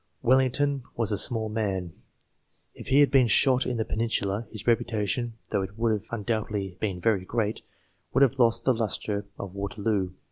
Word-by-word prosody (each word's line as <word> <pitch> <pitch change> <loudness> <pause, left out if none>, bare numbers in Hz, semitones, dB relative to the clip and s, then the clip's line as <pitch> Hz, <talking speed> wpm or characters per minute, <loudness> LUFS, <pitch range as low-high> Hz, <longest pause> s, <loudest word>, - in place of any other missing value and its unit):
Wellington 135 +2 +2
was 115 -2 0
a - - +2
small 110 -3 0
man; 100 -6 -2 0.8
if - - -11
he 135 +2 +5
had 145 - +4
been 135 -3 +5
shot 130 +2 +4
in 125 - -1
the 110 - -1
Peninsula, 110 -1 -1
his 110 -3 -8
reputation, 115 0 0 0.2
though - - +1
it 95 +2 -6
would 115 0 +1
have 105 -2 -2
undoubtedly 105 -4 -3
been 100 -4 -2
very 100 0 +1
great, 110 +2 -2 0.5
would 135 - +4
have 135 0 +2
lost 115 -2 +3
the 130 - +3
lustre 105 -2 -2
of 95 -2 -7
Waterloo. 100 -1 -2
110 Hz, 175 wpm, -27 LUFS, 100-120 Hz, 0.8 s, he